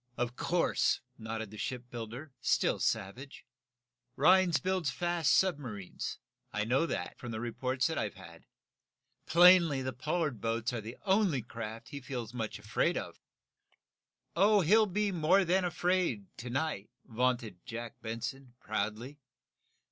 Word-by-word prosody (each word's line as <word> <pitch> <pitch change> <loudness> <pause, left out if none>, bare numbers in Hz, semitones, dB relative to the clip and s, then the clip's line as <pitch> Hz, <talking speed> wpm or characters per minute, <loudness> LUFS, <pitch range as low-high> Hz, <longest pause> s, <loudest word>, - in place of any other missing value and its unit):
"Of 120 0 -2
course," 175 +5 +1 0.2
nodded 110 -1 -5
the 110 - -10
shipbuilder, 125 +2 -6
still - - +2
savage. 125 +9 -3 0.7
"Rhinds 175 +1 +5
builds 185 -1 0
fast 175 +3 0
submarines. 130 - -1 0.3
I 105 0 -1
know 130 +8 +2
that, - - -4
from 120 - -7
the 110 -1 -4
reports 125 +2 -1
I've 110 - -2
had. 85 -3 -13 0.8
Plainly, 170 -3 +6
the 130 0 -3
Pollard 150 - -2
boats 115 +1 -1
are 115 - -2
the 110 +3 -8
only 190 - +2
craft 115 0 -7
he 140 - -7
feels 125 -3 -5
much 115 -3 -3
afraid - - 0
of." - - -6 1.1
"He'll 210 +1 +5
be 205 +2 0
more 180 +3 +3
than 185 +2 +2
afraid, 175 - 0
to 120 +2 -6
night," 135 -5 -2 0.2
vaunted 120 -6 -1
Jack 115 0 -7
Benson, 120 +3 -5
proudly. 110 +6 -3
130 Hz, 130 wpm, -32 LUFS, 115-170 Hz, 1.1 s, Plainly